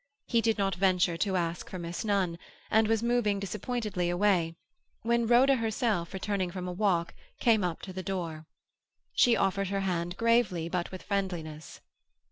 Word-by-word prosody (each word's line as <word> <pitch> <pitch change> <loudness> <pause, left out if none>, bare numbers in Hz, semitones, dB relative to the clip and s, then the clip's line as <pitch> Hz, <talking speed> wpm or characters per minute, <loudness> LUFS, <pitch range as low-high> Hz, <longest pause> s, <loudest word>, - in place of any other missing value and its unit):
He 230 -2 +2
did 225 -1 +1
not 195 -1 +1
venture 180 -2 +2
to 195 +1 0
ask 170 -1 -2
for 185 - -6
Miss 170 +3 -5
Nunn, 190 -5 0 0.3
and 220 0 +4
was 225 0 +1
moving 235 -4 +1
disappointedly 205 -2 -2
away, 175 -3 +2 0.5
when 235 0 +1
Rhoda 260 +3 +5
herself, 220 -6 -1
returning 190 -1 -2
from 180 0 -5
a - - -3
walk, 175 -3 +1 0.3
came 225 -5 +3
up 175 -3 -3
to 190 - -7
the 185 - -4
door. 165 -5 -4 0.7
She 240 -2 +4
offered 195 0 +1
her 195 +1 -1
hand 175 -2 -2
gravely, 230 -8 +2
but 175 0 -2
with 185 - -8
friendliness. 175 -6 -4
195 Hz, 165 wpm, -29 LUFS, 175-220 Hz, 0.7 s, Rhoda